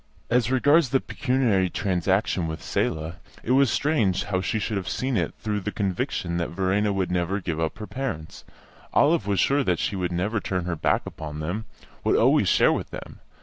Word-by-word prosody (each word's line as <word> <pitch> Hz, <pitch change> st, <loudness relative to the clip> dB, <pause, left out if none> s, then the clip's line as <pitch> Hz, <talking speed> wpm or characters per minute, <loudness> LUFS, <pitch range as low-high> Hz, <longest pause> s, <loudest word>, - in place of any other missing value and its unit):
As 120 Hz, -1 st, +3 dB
regards 145 Hz, +3 st, +4 dB
the 135 Hz, -, +3 dB
pecuniary 125 Hz, -11 st, +1 dB
transaction 95 Hz, -1 st, 0 dB
with 80 Hz, -1 st, -5 dB
Selah, 80 Hz, +2 st, -2 dB, 0.3 s
it 120 Hz, -, -1 dB
was 135 Hz, 0 st, +5 dB
strange 115 Hz, -, +1 dB
how 95 Hz, -3 st, -1 dB
she 110 Hz, -, -1 dB
should 105 Hz, 0 st, -2 dB
have 95 Hz, -1 st, -3 dB
seen 130 Hz, +4 st, -1 dB
it -, -, -1 dB
through 105 Hz, -1 st, -2 dB
the 105 Hz, +2 st, -4 dB
conviction 90 Hz, -3 st, -2 dB
that 85 Hz, -, -1 dB
Verena 95 Hz, +3 st, +1 dB
would 95 Hz, -2 st, -1 dB
never 90 Hz, +3 st, 0 dB
give 85 Hz, -4 st, -3 dB
up 80 Hz, +3 st, -1 dB
her 105 Hz, -, -6 dB
parents. 115 Hz, -12 st, -5 dB, 0.5 s
Olive 145 Hz, -, +3 dB
was 100 Hz, -2 st, +1 dB
sure 140 Hz, +1 st, +3 dB
that 90 Hz, -7 st, +1 dB
she -, -, -1 dB
would 90 Hz, -2 st, -2 dB
never 100 Hz, +6 st, 0 dB
turn 90 Hz, -3 st, -2 dB
her 90 Hz, -1 st, -2 dB
back -, -, +1 dB
upon 75 Hz, -1 st, -7 dB
them, 90 Hz, +8 st, -3 dB, 0.4 s
would -, -, +2 dB
always -, -, +4 dB
share -, -, +4 dB
with -, -, -3 dB
them. -, -, -9 dB
95 Hz, 195 wpm, -25 LUFS, 90-115 Hz, 0.5 s, was